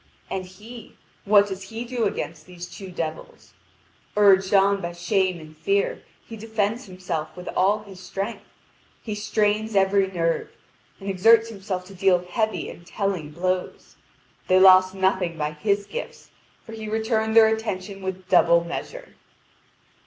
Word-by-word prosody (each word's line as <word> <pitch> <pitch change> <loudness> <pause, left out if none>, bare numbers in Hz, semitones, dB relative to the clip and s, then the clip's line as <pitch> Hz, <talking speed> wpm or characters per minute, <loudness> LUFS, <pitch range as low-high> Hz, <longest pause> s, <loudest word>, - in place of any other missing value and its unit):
And 185 -1 -3
he 220 +6 -12 0.3
what 205 0 +6
does 190 -1 -7
he 230 +2 -5
do 240 -2 -1
against 160 -5 -4
these 180 -1 -8
two 190 +1 -10
devils? 165 -3 -6 0.6
Urged 195 -2 +5
on 200 0 +4
by 170 0 -4
shame 185 0 0
and 155 0 -13
fear, 410 - 0 0.2
he 225 - -9
defends 220 +1 -2
himself 180 -5 -5
with 180 - -9
all 205 +3 +1
his 195 -3 -12
strength. 200 +3 -5 0.6
He 215 - -4
strains 210 +1 0
every 195 0 +3
nerve, 165 -3 -1 0.5
and 195 - -9
exerts 225 +4 +4
himself 195 -4 -5
to 195 - -13
deal 180 -1 +2
heavy, 220 +4 -1
and 170 - -10
telling 185 -4 -3
blows; 185 +3 -3 0.5
they 185 0 +5
lost 185 0 +7
nothing 190 -3 0
by 150 -1 -2
his 200 +6 -1
gifts, - - -8 0.3
for 225 - -11
he 220 -1 -7
returned 220 0 0
their 220 -1 +7
attentions 200 -3 -5
with 190 -1 -5
double 170 -2 +5
measure. - - -7
195 Hz, 150 wpm, -24 LUFS, 180-215 Hz, 0.6 s, lost